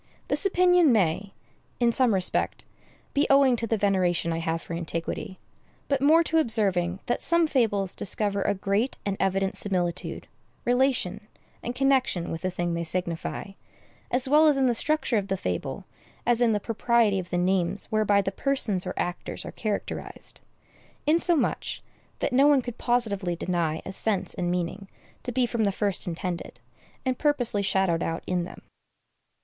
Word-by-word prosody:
This - - +4
opinion 360 -4 +4
may, 195 -1 0 0.4
in 240 -1 +3
some 240 -3 +2
respect, 185 -1 0 0.5
be 285 +1 +2
owing 275 -2 +5
to 230 - -2
the 225 - 0
veneration 185 -4 +1
I 165 - -2
have 165 0 -2
for - - -7
antiquity, 170 +2 -4 0.5
but 275 -2 0
more 315 +4 +5
to 325 0 +2
observing 195 - +1
that 240 - -1
some 335 0 +3
fables 210 - +1
discover 200 0 +2
a 205 - 0
great 200 +6 -1
and 200 -1 -1
evident 195 0 0
similitude, 180 -3 -2 0.4
relation, 245 -5 +1 0.3
and 240 +1 -5
connection 260 -10 +1
with 165 - -5
the 185 - -1
thing 175 -1 -2
they 170 0 -2
signify, 170 +2 -3 0.6
as 250 +2 +2
well 305 +3 +5
in 275 -3 +3
the 245 - +3
structure 290 -1 +1
of 200 -1 -1
the 195 -1 -1
fable 90 - -4 0.4
as 240 0 +2
in 235 -2 +4
the 210 - +1
propriety 230 -2 +1
of 180 -1 -7
the 175 - -1
names 185 +1 +1
whereby 210 -2 +3
the 195 - -2
persons 210 -6 0
or 185 - -4
actors 175 0 -4
are - - -6
characterized; 210 -2 -4 0.6
insomuch, 330 +1 +1 0.3
that - - -2
no 275 +3 +5
one 285 -3 +4
could 245 -1 -7
positively 205 -7 0
deny 170 -3 -2
a - - -5
sense 190 -2 +1
and 180 -2 -2
meaning 180 +3 -3 0.3
to 250 - -5
be 250 +1 +2
from 235 -1 -1
the 200 - +2
first 200 -2 -1
intended, 175 0 -5 0.5
and 255 -1 -1
purposely 250 -8 +2
shadowed 190 -4 +1
out 165 0 -3
in 180 -1 -1
them. - - -12
205 Hz, 165 wpm, -26 LUFS, 180-250 Hz, 0.6 s, owing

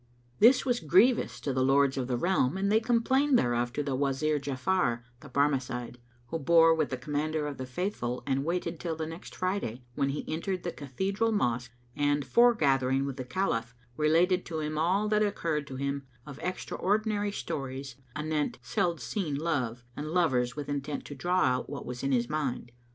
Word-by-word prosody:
This 250 +5 +6
was 245 -2 +1
grievous 195 - +3
to 140 - -2
the 130 0 +1
Lords 135 0 +4
of 130 -2 -2
the 125 -2 0
Realm 175 -1 +1
and 200 +1 +1
they 220 - +5
complained 250 +4 +3
thereof 120 - +1
to 145 - -1
the 140 -1 -2
Wazir 145 +2 +1
Ja'afar 130 -2 0 0.2
the 140 - -12
Barmecide, 130 -3 0 0.3
who 165 - -2
bore 165 +2 +6
with 155 -2 0
the 130 - -3
Commander 150 +3 -2
of 145 -2 -4
the 130 - -4
Faithful 130 -5 -3
and 135 0 0
waited 170 0 -2
till 170 -2 -3
the 160 0 -3
next 165 +2 -9
Friday, 185 - -2
when 140 +1 0
he 140 - -3
entered 180 +4 -2
the 175 - -2
cathedral 195 - -1
mosque 125 - 0 0.3
and, 145 -1 +1
foregathering 135 - +3
with 140 -1 -4
the 130 - -3
Caliph, 125 -5 -1 0.2
related 170 +5 +3
to 160 -2 -3
him 155 0 -3
all 185 +7 +2
that 210 0 +2
occurred 165 -8 -1
to 130 - -7
him 140 0 -3 0.2
of 140 -1 -9
extra 185 +1 -4
ordinary 205 +1 0
stories 135 -7 -5 0.2
anent 150 -1 -1
seld 170 - 0
seen 175 -9 -2
love 130 -7 -1
and 150 - -5
lovers 130 -8 +1
with 145 -2 -5
intent 145 0 -3
to - - -7
draw 180 +5 0
out 125 0 +1
what 140 -2 -6
was 125 0 -5
in 135 - 0
his 120 -2 +2
mind. 140 -5 -2
150 Hz, 190 wpm, -29 LUFS, 130-180 Hz, 0.3 s, This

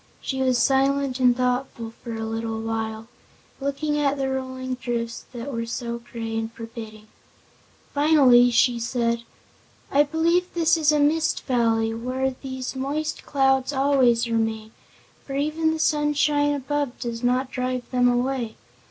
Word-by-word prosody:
She 265 -1 -3
was 255 -1 +2
silent 270 +1 +2
and 250 -1 +4
thoughtful 250 -2 -2
for 235 -2 -5
a 225 0 -4
little 225 0 -3
while, 225 0 -3 0.5
looking 290 +2 -1
at 285 -1 +1
the 270 -1 -1
rolling 260 -1 -4
drifts 235 -2 -4
that 250 +3 -6
were 230 0 -3
so 235 0 -4
gray 230 -1 -6
and 225 0 -2
forbidding. 225 -2 -9 0.9
Finally 280 -5 +6
she 240 0 +3
said: 235 0 0 0.7
"I 285 - +5
believe 335 +4 +1
this 335 0 +4
is 310 -2 +3
a 300 - +2
Mist 305 +2 +2
Valley, 225 -3 +1
where 255 +3 -2
these 260 -1 -5
moist 290 +4 -3
clouds 270 0 +2
always 265 -4 +3
remain, 225 -1 -1 0.5
for 275 - -6
even 310 +3 0
the 320 - -3
sunshine 295 -1 +2
above 285 -1 -2
does 235 -1 -4
not 255 +2 +1
drive 255 -1 -2
them 250 -1 +3
away. 245 -2 -1
255 Hz, 145 wpm, -24 LUFS, 235-280 Hz, 0.9 s, Finally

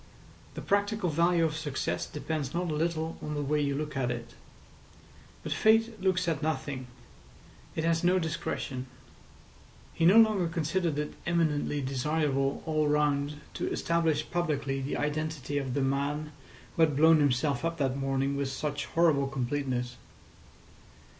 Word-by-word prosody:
The - - -6
practical 205 -2 +1
value 170 +2 +3
of 155 -1 -1
success 150 -3 -2
depends 150 -1 -4
not 175 -1 -1
a - - -1
little 160 +1 -1
on 150 0 -4
the 145 - -1
way 150 +2 +1
you 140 -1 0
look 150 0 -4
at 130 -2 0
it. 120 -1 -5 1.1
But - - -5
Fate 225 -1 +3
looks 185 -1 +1
at 160 -3 0
nothing. 140 -4 -2 0.9
It 160 - -1
has 165 0 +1
no 180 +1 +4
discretion. 150 -5 -3 1.1
He 165 - +3
no 195 +5 +7
longer 215 -6 +5
considered 165 -1 -1
it 150 0 -2
eminently 155 -4 +1
desirable 135 +1 0
all 155 -2 +1
round 145 0 +1
to - - -3
establish 165 -2 +1
publicly 145 -5 -1
the 135 - -2
identity 150 -1 -2
of 135 -2 -3
the 140 - +1
man 140 +3 -1 0.4
who - - 0
had 155 -3 +4
blown 160 +2 +6
himself 140 -1 +1
up 165 0 -1
that 135 -3 0
morning 135 0 0
with 140 -1 -1
such 145 +1 -3
horrible 155 -5 +3
completeness. 130 -1 -2
150 Hz, 150 wpm, -29 LUFS, 140-165 Hz, 1.1 s, no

